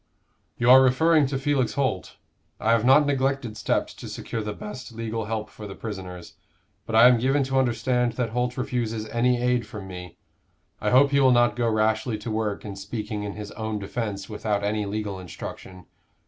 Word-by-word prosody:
"You 120 - 0
are 130 +1 +9
referring 150 +3 +4
to 135 0 -2
Felix 135 -2 0
Holt. 130 -10 -2 0.4
I 110 - +1
have 115 -2 +3
not 135 +4 +6
neglected 135 -4 0
steps 110 - -1
to - - -9
secure 115 - -5
the 105 0 -4
best 110 +4 -8
legal 115 -1 -4
help 110 0 -3
for 105 - -9
the 95 - -8
prisoners: 95 -5 -7 0.5
but 110 - -2
I 115 +2 +9
am 125 -2 +5
given 135 +4 +2
to 135 0 +1
understand 125 -1 +1
that 120 -2 -2
Holt 125 +1 -1
refuses 120 -4 -2
any 120 +1 +2
aid 125 -2 +1
from 105 -2 -8
me. 90 -2 -9 0.6
I 105 - +1
hope 135 +4 +5
he 140 - +3
will 135 -1 +5
not 120 -1 +4
go 120 -1 +1
rashly 110 +1 +1
to 105 +2 -6
work 110 -2 -2
in 100 -2 -6
speaking 105 +2 -5
in 100 -1 -4
his 105 -1 -8
own 110 -1 -4
defence 100 -1 -4
without 105 -1 -2
any 105 0 -1
legal 100 -2 -3
instruction. 90 +1 -9
115 Hz, 190 wpm, -25 LUFS, 105-125 Hz, 0.6 s, are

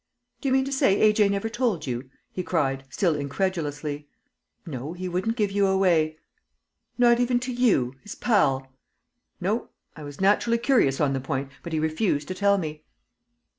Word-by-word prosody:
"Do 280 - -2
you - - +2
mean 265 0 +3
to 275 - -4
say 270 -8 +3
A.J. 210 -1 +4
never 200 +2 -1
told 225 - -1
you?" 125 0 -4 0.2
he 185 - -3
cried, 135 -7 -1
still 170 +4 +1
incredulously. 150 -1 -3 0.6
"No; 145 0 -5
he 185 +1 -5
wouldn't 185 +6 -1
give 210 -4 0
you 200 0 +2
away." 170 -5 +2 0.8
"Not 240 -1 +5
even 245 0 +2
to 255 0 -3
you 215 - +2
his 210 - -9
pal?" 135 - +1 0.7
"No. 210 +6 -1 0.3
I 155 - -10
was 145 -1 -9
naturally 210 +4 +3
curious 230 - +2
on 145 -2 +2
the 135 - -2
point. 135 +1 -3
But 170 - -7
he 160 - 0
refused 155 -1 0
to - - -2
tell 200 +1 +3
me." 155 -4 -5
185 Hz, 170 wpm, -25 LUFS, 145-215 Hz, 0.8 s, Not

